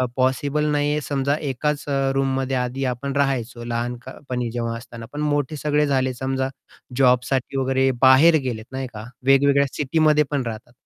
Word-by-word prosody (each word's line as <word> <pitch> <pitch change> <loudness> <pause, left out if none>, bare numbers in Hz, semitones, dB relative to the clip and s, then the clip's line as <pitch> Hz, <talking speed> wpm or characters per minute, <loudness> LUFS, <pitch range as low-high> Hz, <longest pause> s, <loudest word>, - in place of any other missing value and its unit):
अ, - - +3
possible 135 +3 +1
नाहीये. 145 +1 +1
समजा 140 -1 -1 0.2
एकाच 145 +3 -2
अ, 135 -1 +1
रूममध्ये 135 -1 0
आधी 125 +2 -2
आपण 130 +2 -2
राहायचो 125 -4 -1
लहानपणी 120 +1 -4
जेव्हा 115 -1 -3
असताना. 115 -1 -10
पण 150 - -5
मोठे 145 0 0
सगळे 150 0 +1
झाले, 130 -2 +1
समजा 130 +1 -2 0.5
जॉबसाठी 125 +1 +2
वगैरे 135 0 +2
बाहेर 135 +5 +7
गेलेत, 110 -4 -3
नाही 130 0 -3
का? 105 0 -8 0.2
वेगवेगळ्या 140 +1 +4
सिटीमध्ये 150 +1 +2
पण 145 -2 0
राहतात. 115 +1 -7
135 Hz, 155 wpm, -22 LUFS, 125-140 Hz, 0.5 s, बाहेर